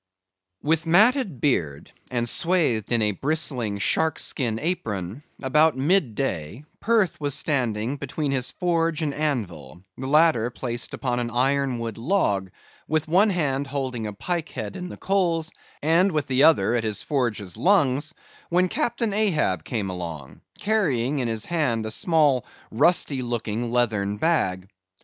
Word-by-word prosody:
With 160 +2 +1
matted 205 - +4
beard, 80 - -1 0.2
and 120 -2 -1
swathed 150 - +1
in 115 -2 +3
a 105 - +2
bristling 130 - -2
shark 160 +9 +1
skin 115 -5 -2
apron, 115 - -3 0.2
about 150 +2 +3
mid 140 - +2
day, 115 - -3
Perth 215 -8 +1
was 145 -2 -1
standing 125 -2 -1
between 140 +1 -3
his 130 -2 0
forge 165 -3 0
and 145 -2 -1
anvil, 90 - -3 0.2
the 130 - -4
latter 150 -5 +4
placed 120 -1 -4
upon 125 -2 -2
an 120 -1 -2
iron 135 +2 +1
wood 115 -2 -5
log, 115 - 0 0.4
with 155 0 0
one 190 +7 +4
hand 145 -7 0
holding 130 -5 -3
a 105 - -6
pike 170 - -3
head 110 -5 -6
in 180 -1 -6
the - - -9
coals, 175 -4 0 0.3
and 170 +5 +3
with 150 -4 0
the 135 -1 +1
other 115 -9 +4
at 120 -2 0
his 105 -2 -2
forge's 115 - -2
lungs, 155 -5 +2 0.3
when 180 +1 +2
Captain 230 0 -1
Ahab 155 - +1
came 100 -3 -3
along, 85 -6 -7 0.2
carrying 145 - 0
in 125 - -1
his 110 -1 -2
hand 135 -10 0
a 110 - -3
small 150 - +2 0.3
rusty 140 +1 +2
looking 120 -1 -3
leathern 105 -4 0
bag. 95 - 0
135 Hz, 150 wpm, -24 LUFS, 115-165 Hz, 0.4 s, matted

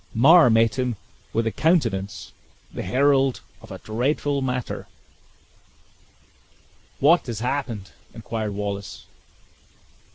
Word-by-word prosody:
Mar 155 +5 +7
met 115 +2 +2
him 125 -2 -1 0.4
with 115 0 0
a 115 - 0
countenance, 115 - 0 0.4
the - - -5
herald 135 +4 +2 0.2
of - - -14
a - - -7
dreadful 140 +5 -1
matter. 125 -2 -3 2.1
"What 160 +4 +4
has 115 -3 -4
happened?" 120 - -3 0.2
inquired 110 -3 -5
Wallace. 100 -1 -5
120 Hz, 100 wpm, -23 LUFS, 110-140 Hz, 2.1 s, Mar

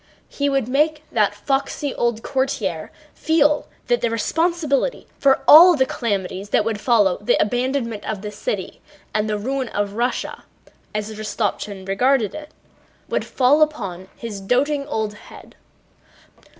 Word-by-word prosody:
He 285 0 -1
would 270 -4 0
make 300 +3 +1
that 210 -2 +1
foxy 275 +4 -2
old 235 -1 -1
courtier 220 - -2 0.2
feel 300 -2 +2 0.2
that 240 -1 +1
the 235 - +1
responsibility 320 - 0
for 270 -1 +3
all 345 +3 +10
the 260 -3 +2
calamities 200 -5 -3
that 210 - +2
would 220 -2 -2
follow 210 -7 +3
the 205 - +2
abandonment 245 -1 -1
of 210 -2 -4
the 210 - -5
city - - -4 0.3
and 215 0 0
the 210 - 0
ruin 260 +4 -2
of 205 -1 -2
Russia 240 +3 -2 0.5
(as 210 +1 -3
Rostopchín 210 -2 -3
regarded 245 +3 +2
it) 305 0 -8 0.6
would - - 0
fall 275 +4 +3
upon 195 - -1
his 215 -4 -6
doting 280 +7 0
old 220 -7 -2
head. 210 - -15
240 Hz, 140 wpm, -21 LUFS, 210-280 Hz, 0.6 s, all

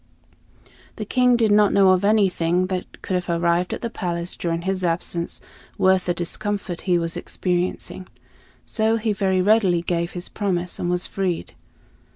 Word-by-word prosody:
The 215 - -5
King 250 +2 +3
did 225 -3 +2
not 205 -1 +5
know 195 -1 +5
of 185 0 +3
anything 185 -4 +2
that 180 - -6
could - - -3
have - - -12
arrived 170 +1 +1
at - - -5
the 235 - -1
palace 170 -3 -3
during 170 -1 -2
his 190 0 -2
absence 170 0 -2 0.4
worth 190 -1 +3
the 175 - +2
discomfort 195 0 -3
he 175 - +4
was 165 -1 -1
experiencing; 180 +1 -3 0.6
so 220 0 +1
he 220 -1 0
very 190 -2 +1
readily 195 -5 +3
gave 170 0 -1
his 175 0 -5
promise, 180 -4 -2
and 175 - -1
was 180 0 0
freed. 185 -3 -3
185 Hz, 165 wpm, -22 LUFS, 175-205 Hz, 0.6 s, not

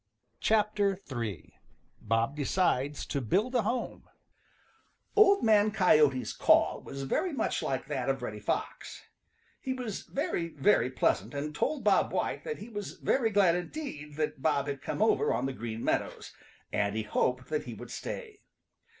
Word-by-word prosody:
III. 115 - -5 0.5
BOB 115 +5 0
DECIDES 145 -2 0
TO 140 - -2
BUILD 205 - +1
A 245 - +3
HOME 235 +4 -3 1.1
|OLD 400 -1 +6
Man 215 -2 +5
Coyote's 150 - +3
call - - +3
was 135 0 -7
very 350 - 0
much 285 - -1
like - - -2
that - - -2
of - - -1
Reddy - - -5
Fox. - - -4 0.6
He 260 - -3
was 245 -6 -4
very, 170 - -2
very 190 - +3
pleasant 130 +2 0
and 150 +2 -3
told 290 - -1
Bob - - +3
White - - -2
that 460 - -3
he - - -9
was 205 -4 -6
very 245 -4 +1
glad 200 -5 +4
indeed 175 - -5
that 155 -3 -2
Bob 140 +1 +2
had 140 -1 -4
come 210 - -1
over 435 - +3
on - - 0
the 135 - -2
Green 115 -2 -5
Meadows, - - -2 0.4
and 100 0 0
he 110 - -1
hoped 125 +4 -1
that 155 -1 -1
he 120 -3 -7
would 120 +2 -10
stay. 430 - -6
150 Hz, 160 wpm, -30 LUFS, -, 1.1 s, |OLD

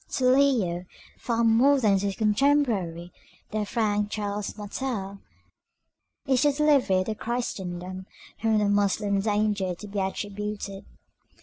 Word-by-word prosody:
To 255 - 0
Leo, 250 -10 +3 0.3
far 235 -1 0
more 245 +5 +5
than 205 -5 +3
to 200 - -1
his 195 - -3
contemporary 210 - +1 0.4
the 215 -1 -2
Frank 210 -3 0
Charles 205 -1 -4
Martel, 205 -2 -4 1.1
is 260 -3 +2
the 290 - +4
delivery 275 -10 +3
of 215 - -3
Christendom 185 -6 -4 0.3
from 225 -1 +2
the 210 -1 +2
Moslem 200 0 +1
danger 205 -3 0
to 210 - -10
be 200 0 -4
attributed. 200 0 -4
210 Hz, 125 wpm, -26 LUFS, 195-235 Hz, 1.1 s, more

